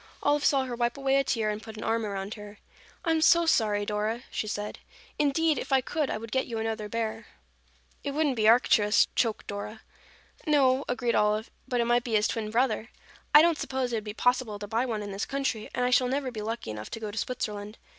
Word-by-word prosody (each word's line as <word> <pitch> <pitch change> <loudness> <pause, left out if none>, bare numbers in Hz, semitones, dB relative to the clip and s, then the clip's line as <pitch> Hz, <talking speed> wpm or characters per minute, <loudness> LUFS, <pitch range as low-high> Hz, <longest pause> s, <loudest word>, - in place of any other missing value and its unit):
Olive 290 0 +2
saw 270 -2 +3
her 250 -2 -4
wipe 240 +1 -1
away 270 0 +2
a 275 - +3
tear 220 -5 0
and 210 0 -5
put 220 -1 -10
an 215 - -6
arm 225 -1 0
around 200 +1 -4
her. 210 -1 -10 0.5
"I 330 - +2
am 320 -1 +2
so 335 +1 +5
sorry, 210 -9 +2
Dora," 215 +3 -2
she 215 - -3
said. 210 0 -4 0.4
"Indeed, 300 +2 +2
if - - -7
I 270 - +5
could, 295 +2 -2
I - - -1
would 225 0 -9
get 260 +2 0
you 230 - -4
another 220 -1 -3
bear." 225 0 -3 0.8
"It 285 - -2
wouldn't 295 -4 +1
be 215 -2 +2
Arcturus," 220 -3 +4
choked 225 -3 0
Dora. 205 +2 -6 0.7
"No," 275 -3 +4
agreed 245 -1 0
Olive, 210 +1 +1 0.2
"but 245 - -1
it 235 - +2
might 240 0 +2
be 235 - -4
his 210 +1 +3
twin 220 -2 -3
brother. 230 0 0 0.4
I 300 +1 +9
don't 335 -2 +2
suppose 260 -2 -2
it - - +1
would 215 - -4
be 210 0 -7
possible 245 -4 +1
to 205 - -6
buy 230 +5 0
one 215 -3 -2
in 205 - -6
this 195 +1 -3
country, 270 -6 -2
and 250 - -1
I 250 - +1
shall 250 0 +4
never 265 0 -1
be 220 -3 -6
lucky 225 - -4
enough 105 0 -7
to - - -6
go 215 -2 -5
to 210 - -9
Switzerland. 210 -3 -4
230 Hz, 235 wpm, -28 LUFS, 215-260 Hz, 0.8 s, I